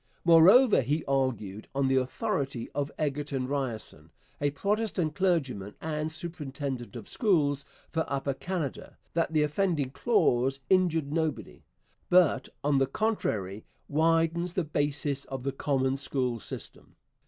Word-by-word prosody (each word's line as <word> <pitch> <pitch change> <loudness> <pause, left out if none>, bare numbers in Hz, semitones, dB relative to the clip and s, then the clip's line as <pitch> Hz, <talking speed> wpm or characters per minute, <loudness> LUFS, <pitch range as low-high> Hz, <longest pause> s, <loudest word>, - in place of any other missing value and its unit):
Moreover, 180 - +7
he 145 +5 -1
argued, 120 -7 -1
on 140 -1 +2
the 130 0 +3
authority 135 - -2
of 145 0 -2
Egerton 145 -3 -2
Ryerson, 115 - -3 0.3
a 145 - +3
Protestant 200 0 -1
clergyman 135 - 0
and 155 0 -2
superintendent 145 -7 -4
of 115 -4 -8
schools 145 - +1 0.3
for 160 -1 0
Upper 140 0 -1
Canada, 165 -1 -4 0.2
that 165 -1 +1
the 155 -2 +3
offending 150 -3 0
clause 135 - +2
injured 165 -6 +3
nobody, 160 -1 -2 0.5
but, 175 -7 +4
on 140 -1 +3
the 135 - +2
contrary, 110 - -1 0.2
'widens 165 +3 +2
the 185 - 0
basis 145 -2 -1
of 135 -2 -6
the 135 - -1
common 135 -1 0
school 125 -4 -1
system.' 95 - -8
145 Hz, 130 wpm, -29 LUFS, 135-165 Hz, 0.5 s, Moreover